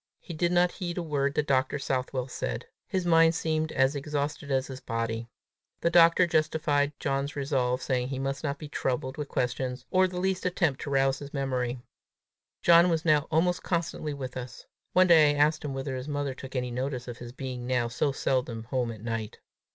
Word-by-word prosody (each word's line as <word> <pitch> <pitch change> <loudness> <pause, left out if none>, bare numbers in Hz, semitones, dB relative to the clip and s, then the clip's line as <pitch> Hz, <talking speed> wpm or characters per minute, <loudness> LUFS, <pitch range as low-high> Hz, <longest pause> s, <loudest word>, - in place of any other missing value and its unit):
He 170 - -9
did 170 +2 0
not 175 0 +4
heed 175 -2 -5
a 175 - -1
word 140 -3 -1
that 150 - +1
Dr. 130 +1 +1
Southwell 130 -2 -2
said. 125 -2 -4 0.2
His 185 -3 -1
mind 165 -1 +5
seemed 160 -1 -1
as 135 +2 +2
exhausted 145 0 -3
as 135 -1 +1
his 130 -2 -8
body. 115 -1 -3 0.5
The 170 - +2
doctor 170 +1 +6
justified 155 -3 +1
John's 140 +1 -1
resolve, 135 -3 0
saying 125 -2 0
he 135 0 -4
must 135 +2 -3
not 140 -1 -2
be 155 - -8
troubled 130 -1 -2
with 150 -2 -4
questions, 125 +1 -2
or 185 0 +4
the 180 -1 -5
least 190 0 0
attempt 175 -6 0
to - - -4
rouse 135 -1 +2
his 145 0 -8
memory. 125 -3 -2 0.8
John 170 +1 +7
was 165 -1 0
now 155 -1 +3
almost 175 +3 +2
constantly 165 -3 -2
with 130 -3 -6
us. 125 -1 -8 0.3
One 185 0 +6
day 160 -4 +7
I - - +2
asked 155 +2 +3
him 140 -2 -4
whether 135 0 -3
his 130 +2 -5
mother 145 -2 -2
took 135 +1 -10
any 125 -1 -1
notice 125 0 -3
of 120 0 -7
his 120 -1 -8
being 125 -1 -6
now 125 -2 +1
so 125 +5 0
seldom 125 -4 -1
home 125 0 -1
at 110 -2 -10
night. 115 -2 -4
140 Hz, 200 wpm, -28 LUFS, 130-160 Hz, 0.8 s, John